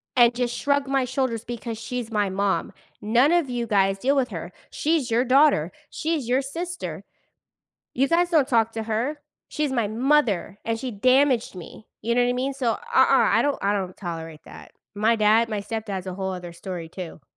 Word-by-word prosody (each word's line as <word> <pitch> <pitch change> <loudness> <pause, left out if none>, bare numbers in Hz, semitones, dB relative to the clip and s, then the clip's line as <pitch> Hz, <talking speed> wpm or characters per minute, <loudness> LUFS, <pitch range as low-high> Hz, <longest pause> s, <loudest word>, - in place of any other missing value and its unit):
and 240 -1 +5
just 245 -1 -1
shrug 280 0 +1
my 270 -1 +1
shoulders 255 -3 -2
because 230 -1 -5
she's 230 0 -5
my 205 -2 +1
mom. 195 +1 -1 0.3
None 245 +8 +3
of 340 -6 +2
you 240 -1 -2
guys 195 -2 +2
deal 275 +5 +2
with 255 -2 +1
her, - - -6 0.2
she's 305 -5 0
your 235 +2 +2
daughter, 260 - +4 0.2
she's 310 -6 -2
your 255 +2 +2
sister, 345 +6 -5 0.9
you 265 +3 +2
guys 345 +1 +3
don't 295 -5 +4
talk 230 -2 +3
to 225 -1 -3
her, 235 +7 -2 0.3
she's 300 -3 -2
my 235 -5 0
mother 225 -5 +1
and 225 0 -1
she 255 -1 -4
damaged 255 +1 +2
me." 180 +4 -11
You 235 +1 0
know 245 - +4
what 245 - +1
I - - +1
mean, 265 +2 -2
so, 250 -4 0
uh-uh, - - -7
I - - +5
don't 290 -1 0
I 200 - +1
don't 185 -2 -3
tolerate 165 -4 -7
that. - - -13 0.2
My 220 +3 +3
dad, 220 +2 +4
my 210 -2 -2
stepdad's 200 -4 -5
a 185 - -4
whole 190 -1 -3
other 175 -1 -7
story 170 -2 -7
too. 170 -4 -8
235 Hz, 195 wpm, -24 LUFS, 205-270 Hz, 0.9 s, and